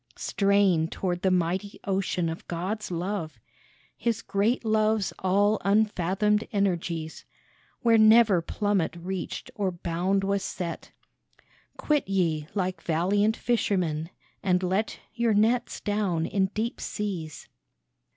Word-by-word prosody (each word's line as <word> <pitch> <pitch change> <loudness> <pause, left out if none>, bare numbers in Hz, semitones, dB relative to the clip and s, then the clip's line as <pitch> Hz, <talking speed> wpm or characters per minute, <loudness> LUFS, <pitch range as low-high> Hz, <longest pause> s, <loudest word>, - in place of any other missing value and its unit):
" - - -31 0.2
Strain 195 -5 +3
toward 175 0 -3
the 190 - +2
mighty 185 +3 -1
ocean 190 -3 -1
of 165 +1 -6
God's 190 +6 -3
love, 175 -1 -3 0.6
His 230 -1 -1
great 220 +5 0
Love's 215 -2 +1
all 200 +3 +2
unfathomed 210 0 +2
energies, 175 -5 -1 0.6
Where 230 -2 +5
never 215 -4 +6
plummet 195 -2 -1
reached 180 +1 -5
or 200 -2 -1
bound 175 +3 -1
was 200 0 0
set. 175 -3 -5 0.9
Quit 295 -8 0
ye 165 -6 0
like 185 -3 -1
valiant 200 +7 +1
fishermen, 175 -9 0 0.3
and 185 -2 +1
let 190 +4 0 0.2
Your 235 -2 +1
nets 230 +4 +2
down 200 -6 0
in 190 +1 +1
deep 220 +4 -3
seas. 180 -7 -4
195 Hz, 120 wpm, -27 LUFS, 175-210 Hz, 0.9 s, never